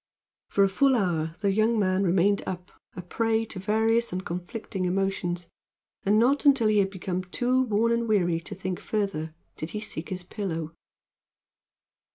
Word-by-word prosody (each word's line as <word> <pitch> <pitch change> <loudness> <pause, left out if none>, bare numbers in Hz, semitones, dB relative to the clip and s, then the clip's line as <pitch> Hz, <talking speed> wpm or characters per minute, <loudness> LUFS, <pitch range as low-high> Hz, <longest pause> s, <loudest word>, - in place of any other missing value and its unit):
For 200 - +3
a - - +5
full 265 +7 +3
hour 165 -7 0
the 200 -2 +2
young 220 +3 +2
man 190 -1 +2
remained 195 +2 +3
up, 180 -1 -5 0.2
a 180 - -6
prey 225 +4 0
to 205 -3 -7
various 225 +4 +1
and 185 +1 -4
conflicting 185 +2 -4
emotions, 180 -2 -1 0.6
and 205 +2 +3
not 260 +6 +3
until 270 -7 +5
he 210 -1 +4
had 195 -1 +2
become 185 -1 -3
too 250 +7 +1
worn 230 -1 +2
and 235 0 +1
weary 175 -6 +2
to 165 - -7
think 185 -1 -4
further 190 -7 -2 0.2
did 155 - -5
he - - -2
seek 180 -6 -5
his 185 -1 -3
pillow. 165 -5 -4
195 Hz, 170 wpm, -27 LUFS, 180-220 Hz, 0.6 s, a